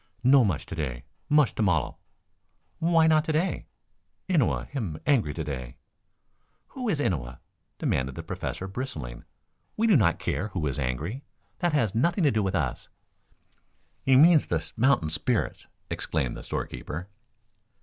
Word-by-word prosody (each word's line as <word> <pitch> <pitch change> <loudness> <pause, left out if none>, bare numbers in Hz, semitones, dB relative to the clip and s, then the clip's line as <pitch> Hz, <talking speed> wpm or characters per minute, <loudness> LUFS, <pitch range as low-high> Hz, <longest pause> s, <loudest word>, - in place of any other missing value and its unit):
"No 130 +1 +6
mush 95 -10 -1
to - - -8
day. 65 -7 -4 0.3
Mush 150 -4 +4
to - - -3
mollel." 90 -9 +1 0.8
"Why 165 -1 +4
not 155 -1 +4
to 160 - 0
day?" 160 +5 -1 0.6
"Innua 165 - +2
him 105 - -4
angry 125 - +3
to 80 - -3
day." 65 -5 -6 0.9
"Who 250 -4 -4
is 160 -8 0
Innua?" 65 - -1 0.4
demanded 65 0 -1
the - - -6
Professor, 95 - -4
bristling. 80 - -6 0.5
"We 225 - +2
do 220 -4 +5
not 95 - +4
care 105 - -2
who 90 -6 -3
is 70 0 -2
angry. 75 - -3 0.4
That 175 -2 +1
has 115 -10 +2
nothing 170 - +2
to 145 - +5
do 110 - +1
with 95 -2 -1
us." 70 -7 -2 1.1
"He 130 - +4
means 155 +3 +6
the 80 -2 -2
mountain 120 - +3
spirits," - - -1 0.2
explained 65 -3 -2
the - - -7
store - - -3
keeper. 85 +5 -7
105 Hz, 155 wpm, -27 LUFS, -, 1.1 s, No